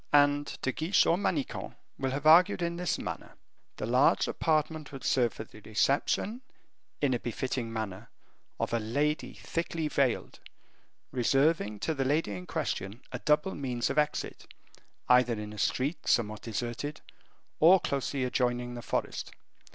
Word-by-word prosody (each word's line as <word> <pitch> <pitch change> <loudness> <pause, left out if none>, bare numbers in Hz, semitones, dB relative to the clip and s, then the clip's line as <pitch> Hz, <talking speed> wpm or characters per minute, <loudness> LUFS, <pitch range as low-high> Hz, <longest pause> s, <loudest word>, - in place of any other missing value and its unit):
And 145 0 +3
De 130 - +1
Guiche 160 +8 +2
or 170 - +4
Manicamp 180 -6 -2 0.2
will 135 - 0
have 140 +3 -3
argued 175 +4 +6
in 170 0 -1
this 180 0 -1
manner. - - -6 0.4
The - - -3
large 125 +5 +3
apartment 155 -1 0
would 135 -2 -8
serve 120 -3 +2
for - - -7
the 110 - -15
reception, 140 - 0 0.6
in 140 -3 +2
a 120 - 0
befitting 120 0 -3
manner, 110 -4 -5 0.5
of - - -1
a 115 - +2
lady 145 +8 -1
thickly 165 -1 -3
veiled, 135 -5 0 0.7
reserving 130 -3 +2
to 160 - 0
the 135 -3 -1
lady 145 -3 +1
in 90 -2 -6
question 100 +6 -3
a 125 - -4
double 150 +8 +2
means 125 -4 -2
of 150 - +2
exit, 150 0 -2 0.6
either 125 -1 +5
in 105 0 -6
a 105 - -8
street 140 - -1
somewhat 110 -2 +1
deserted, 120 +6 -4 0.6
or 180 +4 +7
closely 140 -3 -2
adjoining 125 -1 0
the 120 - -6
forest. - - -3
135 Hz, 150 wpm, -30 LUFS, 120-155 Hz, 0.7 s, or